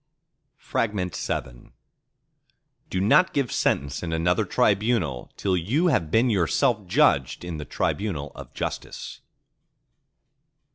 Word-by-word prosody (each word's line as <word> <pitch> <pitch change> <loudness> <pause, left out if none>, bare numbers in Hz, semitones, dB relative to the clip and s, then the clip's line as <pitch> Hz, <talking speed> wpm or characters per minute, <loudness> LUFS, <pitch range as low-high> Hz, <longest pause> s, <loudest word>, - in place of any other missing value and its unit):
VII 90 - -3 1.2
Do 95 - -1
not 110 - +4
give 140 -4 0
sentence 70 +1 0
in 85 - -4
another 90 +6 +1
tribunal 100 - +1
till 95 -2 0
you 125 - +1
have 85 - +1
been 115 +7 +3
yourself 105 - +1
judged 70 -2 +2
in 85 -2 -5
the 75 - -6
tribunal 75 -5 -2
of - - -10
Justice. - - -5
95 Hz, 105 wpm, -25 LUFS, 80-110 Hz, 1.2 s, not